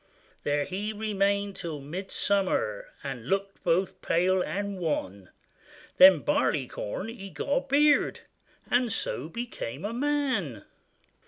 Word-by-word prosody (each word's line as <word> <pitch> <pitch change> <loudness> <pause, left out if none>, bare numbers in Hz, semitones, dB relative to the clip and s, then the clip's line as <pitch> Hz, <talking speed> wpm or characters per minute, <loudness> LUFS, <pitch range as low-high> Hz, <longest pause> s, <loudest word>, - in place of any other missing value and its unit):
There 145 0 0
he 200 +3 -3
remained 200 -2 0
till 165 -6 -5
Midsummer, 185 - -1 0.2
And 135 -4 -5
looked 195 0 -1
both 175 +2 +1
pale 185 +2 +2
and 200 +1 -3
wan; 100 - -3 0.7
Then 185 -4 +9
Barleycorn 130 - -1
he 195 -4 -8
got - - -6
a 275 -2 +3
beard, 290 +2 +3 0.5
And 245 -1 +3
so 150 -5 -2
became 170 - -5
a 215 - -3
man. 255 - -1
190 Hz, 115 wpm, -28 LUFS, 145-210 Hz, 0.7 s, Then